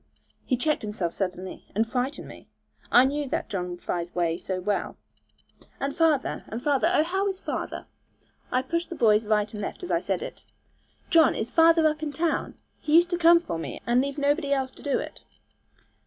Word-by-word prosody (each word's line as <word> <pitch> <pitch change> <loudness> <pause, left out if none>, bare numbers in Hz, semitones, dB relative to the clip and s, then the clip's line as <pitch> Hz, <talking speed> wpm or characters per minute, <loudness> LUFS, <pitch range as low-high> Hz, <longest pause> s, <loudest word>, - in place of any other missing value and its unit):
He 255 - +1
checked 305 +4 0
himself 210 -5 -3
suddenly, 185 -1 -5
and 220 +2 +2
frightened 255 +4 -3
me. - - -13 0.4
I 245 - +7
knew 285 +1 -1
that - - -2
John 180 -2 -3
Fry's 175 0 -4
way 170 -2 +1
so 185 +1 -4
well. 200 +2 -2 0.8
'And 280 +1 -2
father, 320 -5 +1
and 225 - -5
father 285 +4 +2
oh, 335 - +4
how 380 +4 -1
is 385 -1 -3
father?' - - -4 0.7
I 255 +1 +1
pushed 335 +5 -2
the 345 - -5
boys 215 -4 +3
right 210 -1 +1
and 210 - -5
left 205 - -6
as 360 - -4
I - - +3
said - - -2
it. - - -8 0.7
'John, 330 -2 +5
is 230 +2 -3
father 330 0 +5
up 305 0 +1
in 305 -2 -3
town! 325 +2 -1 0.2
He 300 - -2
always 335 +2 +8
used 350 - -18
to 350 - 0
come 340 0 +7
for 335 - -5
me, - - -6
and 240 +1 +3
leave 280 +1 -3
nobody 285 +1 +1
else 265 -2 0
to - - -16
do 285 - 0
it.' - - -7
270 Hz, 200 wpm, -26 LUFS, 210-320 Hz, 0.8 s, always